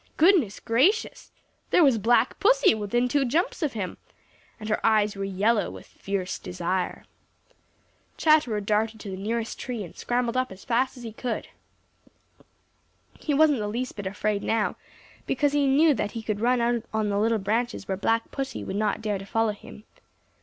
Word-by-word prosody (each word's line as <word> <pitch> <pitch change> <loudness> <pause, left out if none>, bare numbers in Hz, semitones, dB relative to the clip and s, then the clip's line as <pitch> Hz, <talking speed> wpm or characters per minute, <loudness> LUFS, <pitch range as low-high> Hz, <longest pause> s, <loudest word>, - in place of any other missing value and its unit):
Goodness 315 - +4
gracious! 310 - +1 0.4
there 350 - +5
was 265 -6 +4
Black 235 +2 +2
Pussy - - +5
within 220 +3 0
two 280 +2 +1
jumps 315 +9 0
of 300 -4 0
him, 195 -5 -4 0.6
and 215 - -7
her 215 - -1
eyes 210 -2 +3
were 195 - -4
yellow 205 +3 +1
with - - -10
fierce 195 -2 -4
desire. 180 +1 -3 1.1
Chatterer 300 -9 +3
darted 215 +2 0
to 200 - -7
the - - -4
nearest 225 +4 -3
tree 240 -5 -4
and 170 - -11
scrambled 240 0 -1
up 255 -2 0
as 190 0 -12
fast 255 +3 0
as 245 - -10
he 225 -2 -7
could. 235 0 -4 1.7
He 295 - -1
wasn't 295 -3 +4
the 210 - -2
least 245 +4 -4
bit 205 -2 -5
afraid 205 +1 -1
now, 225 -2 0 0.5
because 290 -1 +1
he 290 -1 +2
knew 295 +3 +5
that 205 -4 -3
he 230 - -5
could 215 -2 -2
run 245 +1 +2
out 235 -1 +1
on 220 -1 0
the 200 0 0
little 225 +1 +2
branches 220 +2 -2
where 190 - -1
Black 225 +4 0
Pussy 270 -1 -4
would 190 - -5
not 215 +1 -1
dare 205 -2 -1
to 195 - -9
follow 225 0 +1
him. 210 0 -12
225 Hz, 180 wpm, -26 LUFS, 205-255 Hz, 1.7 s, there